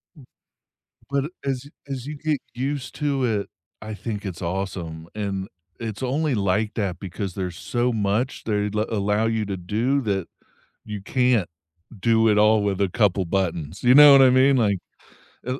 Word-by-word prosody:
M 140 -5 -15 0.8
But 140 +3 -1
as 135 0 -3 0.2
as 135 -2 -5
you 150 +1 -5
get 150 -1 -1
used 135 +1 -3
to 140 -3 0
it, 105 -4 0 0.3
I 110 0 -6
think 105 -1 -5
it's 90 -2 -6
awesome, 85 -3 -4
and 100 -2 -3 0.3
it's 110 0 -5
only 140 +3 0
like 105 +1 0
that 95 -5 -2
because 95 0 -5
there's 90 -2 -4
so 120 +5 -1
much 110 +4 -1
they 105 -1 0
la 105 +1 0
allow 105 0 0
you 110 -1 0
to 100 -1 -3
do 115 +10 0
that 100 -6 -2 0.6
you 105 -2 -6
can't 125 -4 +2 0.5
do 115 +1 +3
it 105 -1 +3
all 105 0 +5
with 100 -1 -1
a 100 - +2
couple 100 -2 +1
buttons, 85 -1 -2
you 125 +1 +5
know 145 0 +10
what 135 -1 +8
I 130 - +7
mean? 130 +2 +5
Like, 105 -5 +2 0.7
L 130 +2 -3
110 Hz, 175 wpm, -23 LUFS, 100-130 Hz, 0.8 s, know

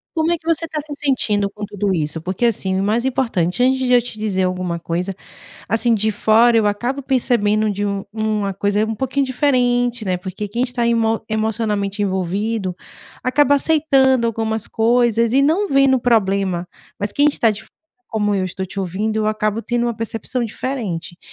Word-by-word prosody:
Como 320 +1 +1
é 345 - +1
que 320 - -30
você 330 0 0
tá 310 -1 -4
se 300 0 -7
sentindo 210 -8 +1
com 210 +1 -7
tudo 205 -1 -2
isso? 160 -2 -1
Porque, 185 +7 -2
assim, 190 -4 0
o - - 0
mais 220 +4 +1
importante 240 -7 0
antes 260 +1 +3
de 255 -1 +1
eu 245 - +6
te 230 -2 -8
dizer 200 -3 0
alguma 180 -2 -2
coisa, 170 +3 -3 0.6
assim, 230 +3 +2
de 220 0 +1
fora, 225 +3 +4
eu 220 -2 +3
acabo 240 +7 -1
percebendo 220 -5 +1
de 205 0 -2
um 200 -1 -2
uma 215 -2 -1
coisa 205 +2 0
um 225 - -2
pouquinho 265 +4 -1
diferente, 245 -3 +1
né. 185 -2 0
Porque 190 +3 -6
quem 235 +5 -2
está 245 -2 0
emo 225 -1 +1
emocionalmente 215 -2 -1
envolvido 190 +1 -1 0.5
acaba 285 +2 +3
aceitando 270 -5 +3
algumas 220 -1 -2
coisas 230 0 +2
e 275 - +5
não 340 +8 +2
vendo 275 -1 +4
o - - -12
problema. 195 -6 +1 0.3
Mas 205 0 -2
quem 290 - +3
está 240 -6 +2
de 210 0 -5
fora, - - -18 0.3
como 210 -2 0
eu 195 -2 0
estou 185 +1 -4
te 190 +2 -8
ouvindo, 195 +4 -2
eu 215 -1 0
acabo 215 0 0
tendo 240 0 -1
uma 235 - -1
percepção 225 +2 -3
diferente. 210 -8 -4
220 Hz, 190 wpm, -19 LUFS, 200-245 Hz, 0.6 s, eu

